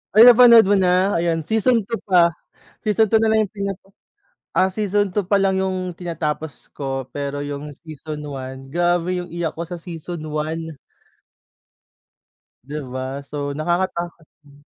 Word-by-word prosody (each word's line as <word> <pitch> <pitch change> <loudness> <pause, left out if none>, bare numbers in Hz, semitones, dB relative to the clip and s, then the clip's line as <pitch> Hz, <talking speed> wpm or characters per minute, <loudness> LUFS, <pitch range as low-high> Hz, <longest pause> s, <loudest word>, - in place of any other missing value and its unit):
Ay! 220 - +10
Napanood 240 -2 +9
mo - - +6
na? 185 +2 +3
Ayan 165 -1 0
season 225 +4 +2
2 230 +3 -4
pa. 175 -2 +5 0.5
Season 215 0 +2
2 220 - +4
na 225 - +2
lang 220 0 +3
yung 205 - -7
pinap 200 -1 -4 0.8
ah, 190 +1 +4
season 205 -1 0
2 205 - +1
pa 200 - +5
lang 195 -1 +2
yung 185 -1 -2
tinatapos 160 -3 -4
ko, 135 -2 -4
pero 145 0 -3
yung 145 +1 -5 0.2
season 155 0 -7
1, 135 -1 -7
grabe 175 +2 +1
yung 175 - -9
iyak 170 -2 -1
ko 170 - -5
sa 175 0 -6
season 170 -1 -7
1. 160 +2 -3 2.0
Di 145 - -7 0.2
ba, 130 +2 -4
so 145 -1 -3
nakakatakot 175 0 -2 0.2
nga. 145 -1 -19
175 Hz, 155 wpm, -21 LUFS, 150-195 Hz, 2.0 s, Ay